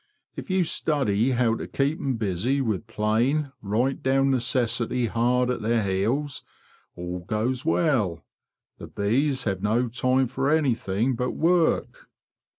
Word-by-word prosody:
"Tf - - -8
you 185 -1 +2
study 135 -9 +1
how 120 -3 +2
to - - -4
keep 140 +3 -1
'em 135 -2 -1
busy, 110 +5 -1
with 110 -5 -2
plain, 115 +7 0
right 115 +7 -1
down 135 +1 +2
necessity 125 -1 0
hard 125 +2 +1
at 125 - -3
their 115 +1 +1
heels, 115 +10 -1 0.5
all 90 +1 -5
goes 115 +8 -2
well. 130 - +1 0.5
The - - -8
bees 130 +6 0
have 95 -3 -2
no 115 +4 +1
time 130 +3 +1
for 135 +3 -1
anything 125 -6 +1
but 125 +1 -2
work. 175 - +1
125 Hz, 140 wpm, -25 LUFS, 110-135 Hz, 0.5 s, you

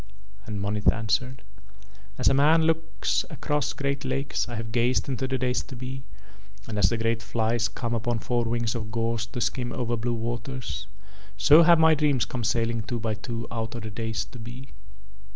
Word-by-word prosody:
And 105 -2 -4
Monith 100 0 +2
answered: 120 +3 -1 0.7
"As 130 - +2
a - - +6
man 155 +4 +5
looks 105 -11 0
across 150 -2 -1
great 140 0 -2
lakes 135 +2 -1
I 120 - -4
have 110 0 -5
gazed 120 -1 +2
into 135 -1 -1
the 130 0 0
days 125 -1 0
to 130 - -10
be, 130 +2 -6 0.7
and 105 -2 -3
as 90 -3 +5
the 115 - 0
great 115 0 0
flies 115 +1 0
come 115 0 -4
upon 115 0 0
four 120 +1 0
wings 115 -1 0
of 110 -3 -4
gauze 115 0 -1
to 115 - -6
skim 120 0 -1
over 120 0 -1
blue 120 +1 -1
waters, 120 -2 -4 0.5
so 145 +12 +8
have 170 0 +7
my 160 0 +6
dreams 145 -5 +2
come 125 -2 -4
sailing 115 +1 +1
two 120 +2 -4
by 110 0 -1
two 115 +2 -5
out 115 0 -3
of 120 - -5
the 110 - -5
days 110 -1 -3
to 110 +5 -12
be. 120 +4 -9
120 Hz, 190 wpm, -26 LUFS, 110-130 Hz, 0.7 s, so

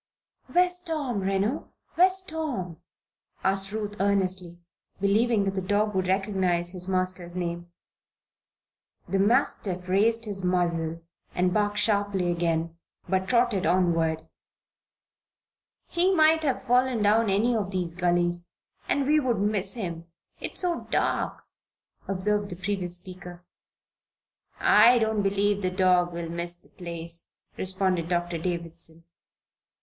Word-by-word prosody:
"Where's 360 0 +2
Tom, 305 - -3
Reno? 195 +7 -1 0.2
Where's 370 +2 +5
Tom?" 285 - -4 0.7
asked 195 0 +1
Ruth, 210 -1 -4
earnestly, 185 -3 0 0.4
believing 210 +2 +2
that 195 -1 -1
the 190 - -2
dog 205 +3 0
would 185 -1 0
recognize 185 -3 +1
his 180 -1 0
master's 185 -2 -1
name. 175 -1 -4 1.4
The 195 - 0
mastiff 195 -5 +1
raised 225 +5 +2
his 200 -3 -4
muzzle 170 -2 0 0.3
and 180 0 +1
barked 205 -1 0
sharply 200 -4 +1
again, 165 -1 -1 0.3
but 190 +1 0
trotted 235 -6 +2
onward. 165 -3 +1 1.6
"He 355 +2 +2
might 320 0 +5
have 270 -4 -1
fallen 250 -2 +2
down 215 +1 +3
any 220 +5 +2
of 205 -4 -1
these 180 -3 -2
gullies, 175 0 0 0.4
and 280 - +1
we'd 305 +2 +4 0.2
miss 205 0 0
him, 170 -7 -5 0.3
it's - - -4
so 355 -2 -2
dark," - - -1 0.6
observed 205 +2 -1
the 180 - -5
previous 180 -1 0
speaker. 180 -1 -11 1.1
"I 230 +4 +6
don't 220 -2 +1
believe 200 +1 +1
the 185 - 0
dog 180 -1 +2
will 170 -1 -5
miss 170 +1 -2
the 175 - -22
place," 170 -1 -4 0.2
responded 185 -3 -1
Doctor 175 -1 -1
Davison. 170 -1 -5
190 Hz, 125 wpm, -26 LUFS, 175-210 Hz, 1.6 s, I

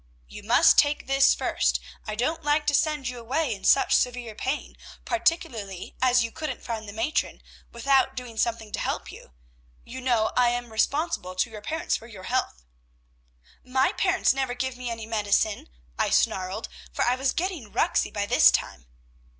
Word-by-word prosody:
"'You - - -10
must 240 +10 +5
take 290 0 +2
this 270 0 +4
first. - - 0 0.3
I 215 - -3
don't 280 +9 -1
like 295 +1 +1
to 295 - +1
send 300 -3 +1
you 245 -1 -5
away 255 +3 -1
in 195 -2 -10
such - - +4
severe 245 -2 0
pain, 265 +7 -4 0.3
particularly 225 - -1
as 255 -1 +4
you 230 - -4
couldn't 310 +4 -5
find 220 -2 -5
the - - -6
matron, 225 +9 -1 0.3
without 265 +3 +2
doing 245 -2 -7
something 225 -1 -1
to - - -3
help - - -3
you. - - -14 0.5
You 260 +2 -8
know 235 -4 +1
I 250 -1 +4
am 240 -1 -3
responsible 280 - -1
to 205 +6 0
your 210 -1 -9
parents 320 - -2
for 225 - -13
your 205 -5 -11
health!' 245 - -2 1.0
"'My 260 +1 +1
parents - - +2
never 265 -2 -2
give 260 0 -3
me 250 -1 -5
any 230 -1 -5
medicine,' 210 - 0 0.3
I - - +2
snarled, 185 - 0 0.2
for - - 0
I 245 - +2
was 265 +1 0
getting 335 - -3
ruxy - - +1
by 205 -1 -2
this 70 - +6
time. - - -2
245 Hz, 175 wpm, -26 LUFS, 220-270 Hz, 1.0 s, this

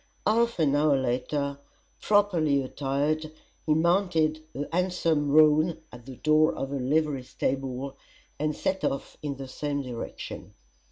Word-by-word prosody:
Half 235 +2 +2
an 150 -5 +2
hour 145 -2 +3
later, 140 +3 -1 0.4
properly 170 -9 +3
attired, 145 +4 -1 0.4
he 155 - +4
mounted 165 -2 +2
a 145 +2 -2
handsome 170 -5 +1
roan 155 +2 +5
at 120 0 -13
the 130 - -8
door 155 +3 +3
of 135 0 -4
a 140 - -1
livery 145 +1 +1
stable, 135 +1 -3 0.4
and 150 0 0
set 190 0 -2
off 135 - -2
in 145 -2 -3
the 135 -1 -7
same 145 +1 -3
direction. 125 -3 -7
150 Hz, 135 wpm, -27 LUFS, 135-160 Hz, 0.4 s, roan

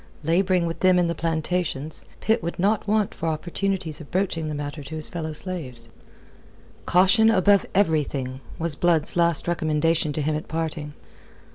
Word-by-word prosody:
Labouring 180 +2 +2
with 165 0 -4
them 185 -1 +4
in 175 - +3
the 170 - 0
plantations, 160 -2 -2 0.2
Pitt 220 +1 +2
would 170 +2 -4
not 205 +4 +1
want 210 -1 +1
for 165 - -4
opportunities 170 0 -2
of 145 - -12
broaching 175 -4 -1
the 150 - -3
matter 145 +1 -5
to 140 +3 -7
his 155 -1 -3
fellow 160 -2 -4
slaves. 145 -9 -5 1.0
"Caution 195 +5 +5
above 200 -1 +4
everything," 145 -8 0 0.2
was 165 -2 -2
Blood's 165 -1 +2
last 170 -2 +2
recommendation 160 -1 +1
to 150 - -2
him 155 +1 0
at 155 - -5
parting. 160 -2 -3
165 Hz, 160 wpm, -24 LUFS, 155-185 Hz, 1.0 s, Caution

